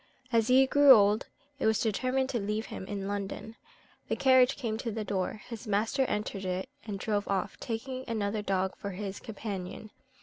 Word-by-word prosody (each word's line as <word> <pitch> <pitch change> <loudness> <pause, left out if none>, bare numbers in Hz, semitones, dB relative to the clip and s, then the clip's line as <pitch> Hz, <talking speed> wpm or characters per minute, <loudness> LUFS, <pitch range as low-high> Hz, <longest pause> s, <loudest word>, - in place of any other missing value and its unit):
As 225 -1 +3
he 260 +1 +6
grew 285 0 +8
old, 210 -1 +4 0.3
it 270 - +2
was 220 -1 +3
determined 255 +4 0
to 240 - -1
leave 210 +2 -2
him 190 - -6
in 200 -1 -4
London. 205 +2 -4 0.5
The - - 0
carriage 260 0 +5
came 225 -4 -2
to 235 - -3
the 220 0 -3
door, 200 +1 -2
his 230 -1 -8
master 220 +6 +1
entered 210 -3 -3
it, 185 +3 -2 0.2
and 205 -2 -3
drove 205 0 -1
off, 195 -2 -2
taking 255 +3 -4
another 215 -2 -1
dog 190 -2 0
for 200 - -6
his 195 +1 -5
companion. 210 -2 -6
215 Hz, 180 wpm, -30 LUFS, 200-245 Hz, 0.5 s, grew